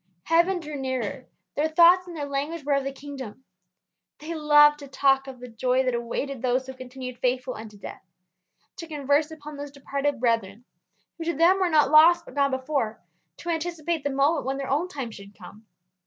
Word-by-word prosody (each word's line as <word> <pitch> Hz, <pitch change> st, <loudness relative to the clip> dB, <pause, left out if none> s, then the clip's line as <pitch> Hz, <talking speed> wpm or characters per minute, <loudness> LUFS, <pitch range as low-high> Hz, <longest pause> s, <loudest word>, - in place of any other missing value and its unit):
Heaven 345 Hz, +3 st, +2 dB
drew 300 Hz, -2 st, -6 dB
nearer; 260 Hz, -2 st, -4 dB, 0.3 s
their 300 Hz, +2 st, +1 dB
thoughts 345 Hz, +3 st, +5 dB
and 345 Hz, -2 st, -8 dB
their 290 Hz, -, -3 dB
language 285 Hz, +3 st, -3 dB
were 285 Hz, +1 st, 0 dB
of 275 Hz, -1 st, +1 dB
the 275 Hz, -, -3 dB
kingdom. 270 Hz, -4 st, -9 dB, 0.7 s
They 315 Hz, +3 st, -6 dB
loved 295 Hz, -1 st, +5 dB
to 285 Hz, -, -10 dB
talk 270 Hz, 0 st, +2 dB
of 260 Hz, -2 st, -9 dB
the 250 Hz, -, -9 dB
joy 250 Hz, +3 st, 0 dB
that 255 Hz, -1 st, 0 dB
awaited 240 Hz, +2 st, -3 dB
those 255 Hz, +1 st, 0 dB
who 265 Hz, -, -8 dB
continued 255 Hz, -1 st, -8 dB
faithful 255 Hz, 0 st, -1 dB
unto 215 Hz, -1 st, -10 dB
death; 200 Hz, -, -9 dB, 0.8 s
to 330 Hz, -, -7 dB
converse 295 Hz, 0 st, +1 dB
upon 300 Hz, -2 st, -10 dB
those 285 Hz, 0 st, -6 dB
departed 280 Hz, 0 st, -3 dB
brethren 230 Hz, -2 st, -1 dB, 0.5 s
who 330 Hz, -, -5 dB
to 340 Hz, -, -1 dB
them 345 Hz, +5 st, +4 dB
were 370 Hz, -2 st, +2 dB
not 300 Hz, -3 st, +3 dB
lost 335 Hz, +2 st, +7 dB
but -, -, -12 dB
gone 280 Hz, 0 st, +2 dB
before; 260 Hz, -4 st, -2 dB, 0.4 s
to 345 Hz, -, -7 dB
anticipate 330 Hz, -1 st, -2 dB
the 285 Hz, -, 0 dB
moment 280 Hz, +3 st, +1 dB
when 270 Hz, 0 st, -1 dB
their 275 Hz, -1 st, -4 dB
own 300 Hz, +6 st, +1 dB
time 270 Hz, -9 st, -6 dB
should 200 Hz, -1 st, -13 dB
come. 210 Hz, +3 st, -14 dB
280 Hz, 195 wpm, -25 LUFS, 255-310 Hz, 0.8 s, lost